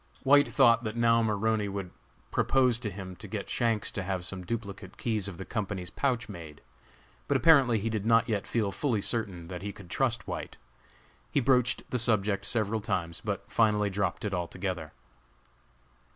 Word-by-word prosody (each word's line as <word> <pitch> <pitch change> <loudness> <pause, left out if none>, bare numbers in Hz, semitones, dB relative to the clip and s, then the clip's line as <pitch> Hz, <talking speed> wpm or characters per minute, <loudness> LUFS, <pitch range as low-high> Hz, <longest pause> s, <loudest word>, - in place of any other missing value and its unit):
White 145 +1 +6
thought 120 -3 +4
that 110 -1 -3
now 115 0 +4
Maroney 110 -1 +1
would 95 -2 -5 0.4
propose 125 -3 +3
to 115 -3 -3
him 95 -1 -8
to - - -9
get - - -5
Shanks 115 -3 0
to 105 - -3
have 95 -1 -3
some 95 0 -5
duplicate 100 0 -6
keys 110 -4 -1
of 95 -4 -7
the 95 - -7
company's 100 -5 -4
pouch 130 -3 0
made; 85 -7 -10 0.7
but - - +3
apparently 135 -8 +5
he 105 +2 -2
did 110 -3 -1
not 115 0 +4
yet 105 -3 -1
feel 110 -4 0
fully 115 -3 0
certain 95 -7 0
that 90 -1 -6
he 100 +1 -4
could 95 -3 -13
trust 120 -4 0
White. - - -5 0.7
He - - +2
broached 125 -1 +2
the 125 - 0
subject 105 -3 +1
several 110 -1 0
times, 85 -4 -2
but 100 -3 -2
finally 105 -2 +3
dropped 95 -1 -1
it 100 - -2
altogether. 90 -2 -3
105 Hz, 175 wpm, -29 LUFS, 95-115 Hz, 0.7 s, White